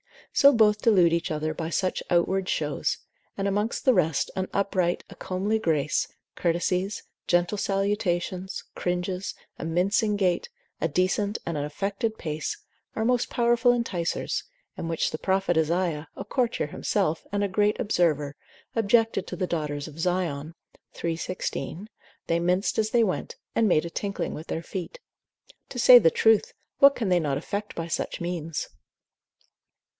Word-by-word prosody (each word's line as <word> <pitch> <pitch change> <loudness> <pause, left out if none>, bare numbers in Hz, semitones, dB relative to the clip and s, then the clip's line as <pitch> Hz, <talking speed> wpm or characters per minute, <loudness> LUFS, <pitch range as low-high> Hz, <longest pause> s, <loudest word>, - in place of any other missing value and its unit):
So 280 0 +7
both 215 -3 +4
delude 185 -8 +5
each 170 0 0
other 155 0 -2
by 160 +1 -4
such 185 +2 0
outward 185 +2 +2
shows; 150 -2 -1 0.4
and 195 - 0
amongst 205 +3 -1
the 260 - +6
rest, 160 - +1
an 190 0 -1
upright, 185 -3 0
a - - -10
comely 200 +4 -1
grace, 155 -7 +1 0.3
courtesies, 180 +3 0 0.2
gentle 175 +3 +2
salutations, 190 -2 -1
cringes, 180 +2 -2 0.2
a - - -4
mincing 195 +6 +2
gait, 185 -3 +1 0.3
a - - +1
decent 185 +6 +1
and 165 - -2
an 145 - -1
affected 200 +8 -2
pace, 155 - -3 0.4
are 220 - 0
most 245 0 +2
powerful 240 0 +3
enticers, 190 -8 -2 0.3
and 165 - -4
which 165 - 0
the - - -3
prophet 190 -2 +1
Isaiah, 160 -1 0
a - - -5
courtier 240 - 0
himself, 165 +1 -1
and 205 0 0
a - - +2
great 210 +2 +2
observer, 150 -8 +1 0.4
objected 225 -2 +2
to - - -5
the 185 - -2
daughters 150 -3 -2
of 155 +1 -11
Zion, 165 -3 -1 0.5
iii. 165 -1 0
16. 185 +2 -4 0.4
they 165 0 +1
minced 180 +5 +1
as 215 0 +1
they 235 0 +4
went, 190 -4 -2 0.2
and 225 - +3
made 170 -4 +3
a - - -4
tinkling 195 -1 -3
with 155 - -8
their 165 - -3
feet. 190 - -6 0.7
To - - -8
say 245 +1 +9
the 165 - +5
truth, 225 +5 +3 0.3
what 280 -1 +8
can 220 -5 -1
they 180 -1 +4
not 145 -4 0
effect 200 +7 -4
by 165 0 -3
such - - -2
means? 165 -3 -3
185 Hz, 160 wpm, -26 LUFS, 165-210 Hz, 0.7 s, say